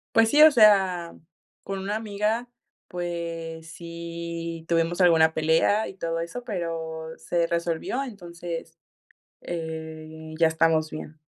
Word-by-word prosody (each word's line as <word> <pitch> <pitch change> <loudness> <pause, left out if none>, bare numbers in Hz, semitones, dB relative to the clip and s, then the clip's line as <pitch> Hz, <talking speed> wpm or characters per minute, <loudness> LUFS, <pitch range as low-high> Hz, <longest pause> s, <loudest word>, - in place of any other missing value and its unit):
Pues 225 0 +6
sí, 295 +4 +5
o 310 0 +10
sea, 190 - +4 0.5
con 195 0 -4
una 200 +2 -2
amiga, 220 +2 -1 0.4
pues, 165 -2 -5
sí 170 -1 -6
tuvimos 170 +2 +1
alguna 160 -3 +5
pelea 160 +8 +2
y - - -9
todo 165 -2 -2
eso, 170 +9 -6
pero 165 -5 -4
se 170 -1 0
resolvió, 170 +9 -1
entonces, 170 -7 -7 0.6
eh, 160 -1 -6
ya 165 0 +5
estamos 160 -1 +2
bien. 155 0 -8
170 Hz, 120 wpm, -26 LUFS, 160-190 Hz, 0.6 s, o